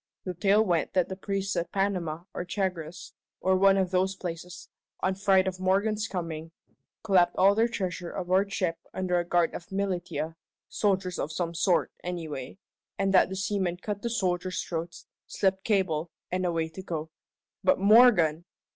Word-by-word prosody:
The 185 - -4
tale 205 +4 +3
went 175 -4 0
that 185 -3 +2
the 190 - -4
priests 195 0 -2
at 170 -1 -2
Panama 180 -5 -1
or - - -3
Chagres, 180 -3 -4 0.3
or 190 0 +2
one 195 +1 +5
of 190 -2 +1
those 190 +1 +1
places, 175 0 -7 0.3
on 190 - +1
fright 190 -1 +3
of 185 -1 -3
Morgan's 205 +3 +1
coming, 165 -3 -5 0.5
clapped 180 -5 +3
all 195 +2 +6
their 225 +3 +3
treasure 180 -7 -4
aboard 190 +2 0
ship 185 -6 -1 0.2
under 180 -1 +1
a - - 0
guard 175 -1 +1
of 175 +3 -8
militia 180 -4 -2 0.3
soldiers 190 -3 0
of 155 - -2
some 170 +1 -2
sort, 170 +1 +2
anyway 160 -6 -5 0.4
and 195 0 +1
that 185 - +5
the 190 - -4
seamen 190 -2 -1
cut 205 +2 -5
the 235 - -2
soldiers' 185 -4 -1
throats, 170 0 -5 0.2
slipped 190 -1 0
cable, 180 -6 +1 0.2
and 185 0 0
away 165 -2 0
to 160 +4 -9
go. 160 -3 -5 0.5
But 280 - +4
Morgan! 195 -7 +5
185 Hz, 165 wpm, -28 LUFS, 170-195 Hz, 0.5 s, all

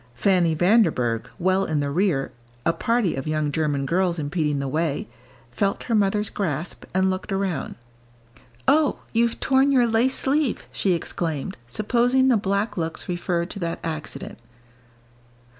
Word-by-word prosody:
Fanny 175 +3 +2
Vanderburgh, 160 - +2
well 190 +1 +2
in 155 -5 -1
the 140 -1 -1
rear, 165 -4 +1 0.3
a 165 - +3
party 230 -4 +1
of 135 +1 -5
young 155 -1 0
German 145 -3 0
girls 175 +3 +1
impeding 150 -1 -1
the 140 0 -2
way, 155 +1 -1 0.4
felt 195 +10 -1
her 235 - -2
mother's 210 0 +1
grasp, 170 -4 -3
and 190 +1 +2
looked 185 +2 -4
around. 195 -5 -2 0.9
"Oh, 305 0 +4 0.2
you've 230 0 +1
torn 270 +1 +3
your 255 -3 +4
lace 235 +3 +2
sleeve!" 280 -1 0
she 190 - +1
exclaimed, 160 -3 -3
supposing 245 - +2
the 250 - +5
black 205 +1 -1
looks 165 -1 -3
referred 175 -1 -2
to - - -6
that 170 -2 -2
accident. 155 -6 -6
185 Hz, 145 wpm, -24 LUFS, 155-215 Hz, 0.9 s, the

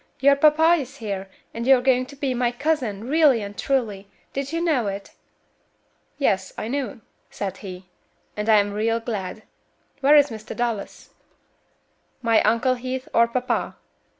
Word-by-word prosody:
your 280 +1 +5
papa 310 +3 +5
is 270 0 -7
here, 195 -4 -5 0.2
and 230 +2 -4
you 265 -1 +7
are - - -2
going 255 0 +2
to 280 - -12
be 275 -2 -1
my 245 -1 +1
cousin, 245 -6 -2
really 285 -6 +4
and 200 0 -7
truly. 215 -8 -1 0.3
Did 275 +1 -3
you 330 - -1
know 305 -10 +1
it?" 195 0 -5 1.1
"Yes, 190 -9 0
I 220 - -4
knew," 270 -2 -3 0.3
said 195 -2 -5
he, 185 -2 -9 0.5
"and 210 +1 -3
I'm 205 -2 +4
real 225 +2 0
glad. 215 -3 -5 0.6
Where 280 +2 +5
is 290 -2 +5
Mr. 220 -1 -8
Dallas?" 235 -4 -4 1.1
"My 230 -1 +4
Uncle 230 +4 +2
Heath, 255 +1 -5
or 235 0 +5
papa?" 245 0 -2
240 Hz, 155 wpm, -23 LUFS, 210-275 Hz, 1.1 s, you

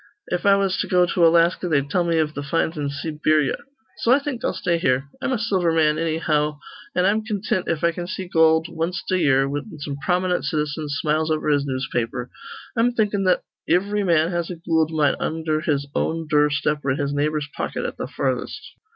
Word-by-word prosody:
If 180 - -1
I 200 - +7
was 195 -1 +1
to - - -1
go 180 -1 +4
to 170 -1 +3
Alaska, 170 +2 +3
they'd 140 -3 +1
tell 180 -2 +2
me 170 -1 +1
iv 155 -1 +1
th' 145 - -5
finds 160 +3 0
in 145 -2 -2
Seeberya. 150 0 0 0.4
So 235 - +2
I 260 - +7
think 280 -4 -4
I'll - - +1
stay 170 -2 -1
here. 130 -2 +1
I'm 265 - -1
a 255 - +1
silver 190 -6 +1
man, 155 -2 +3
annyhow; 155 -2 0 0.4
an' 180 - +2
I'm 215 +3 +2
contint 205 -4 -2
if 165 -1 -1
I 170 - +4
can 175 +1 -6
see 185 0 -5
goold 160 -2 +4
wanst 170 +2 -3
a 185 - +2
year, 135 -4 +3
whin 145 +5 -5
some 145 -1 -5
prominent 180 +5 0
citizen 150 0 -2
smiles 155 +2 0
over 155 -1 0
his 145 -1 +2
newspaper. 125 -2 -3 0.4
I'm 240 +1 +2
thinkin' 205 -4 0
that 180 -1 +2 0.3
ivry 200 +4 +2
man 165 -2 +2
has 170 -1 -2
a 180 - -4
goold 160 -1 +1
mine 150 -3 +2
undher 160 -1 -1
his 145 -3 0
own 165 0 -1
dure 150 -1 +3
step 150 +1 -1
or 140 - -1
in 130 - +1
his 140 0 -1
neighbor's 150 0 0
pocket - - -3
at - - -4
th' - - -4
farthest." - - -2
160 Hz, 210 wpm, -22 LUFS, 150-180 Hz, 0.4 s, I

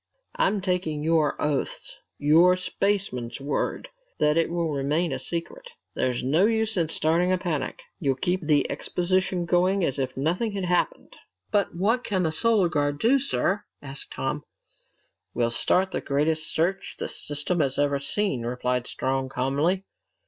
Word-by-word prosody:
I'm 355 - +1
taking 180 -5 -1
your 160 -2 +2
oaths, 145 -2 -2 0.2
your 165 +5 +5
spaceman's 185 -11 -1
word, 145 - -2 0.3
that 150 0 +3
it 165 -1 +2
will 170 -2 -1
remain 150 +4 0
a 130 - -2
secret. 475 - -5 0.2
There's 125 -2 -1
no 155 +10 +3
use 220 -1 +1
in 165 -4 +1
starting 165 +3 +2
a 185 - +3
panic. 155 -8 -3 0.2
You'll 135 -2 +1
keep 180 +7 0
the 150 -2 +2
exposition 185 0 0
going 185 +3 +2
as 140 -3 0
if 130 -1 -2
nothing 175 - 0
had 195 -2 -2
happened." 180 0 -1 0.3
"But 200 -4 +1
what 220 +8 +1
can 190 -5 0
the 160 - +1
Solar 210 +2 +3
Guard 145 -3 0
do, 245 - +3
sir?" 210 -6 0 0.2
asked 140 -1 -6
Tom. 145 +2 -3 0.9
"We'll 120 -1 +1
start 185 +10 +2
the - - -2
greatest 155 +2 0
search 180 +4 -1
the - - -3
system 150 +4 -2
has 135 -3 +1
ever 145 -1 +2
seen," 140 - 0
replied 125 +1 -1
Strong 130 0 -2
calmly. 145 +9 0
165 Hz, 155 wpm, -26 LUFS, 140-185 Hz, 0.9 s, your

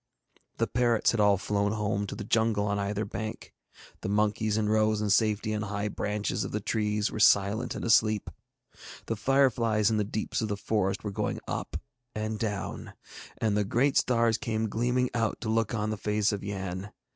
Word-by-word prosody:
The - - +2
parrots 120 -2 +2
had 115 - -2
all 105 -1 +5
flown 100 +1 0
home 105 -1 -1
to - - -5
the 105 - -6
jungle 110 -1 +1
on 100 0 0
either 100 +1 -1
bank, 110 +2 -6 0.5
the - - -3
monkeys 105 +1 +1
in 110 -1 +1
rows 110 0 +2
in 105 -1 0
safety 110 +1 +2
on 105 - -1
high 100 0 -2
branches 105 +1 -2
of - - -5
the 105 - -1
trees 105 0 -1
were - - -5
silent 105 +3 +3
and - - -4
asleep, 110 -2 +3 0.7
the 115 - -2
fireflies 115 -4 +2
in 110 - +1
the 105 - +2
deeps 105 +3 -3
of 110 - -1
the 105 -1 -2
forest 100 -2 -1
were 105 - -3
going - - -2
up - - -3 0.4
and 110 0 -3
down, 105 -3 -4 0.4
and 110 -2 0
the 105 - +2
great 130 +7 +1
stars 115 -2 +2
came 110 -4 -1
gleaming 125 +3 0
out 115 -2 0
to 110 - -3
look 115 0 +1
on 105 0 -1
the 110 - -3
face 105 +1 +1
of 100 -1 -4
Yann. 95 0 -5
105 Hz, 190 wpm, -28 LUFS, 105-110 Hz, 0.7 s, all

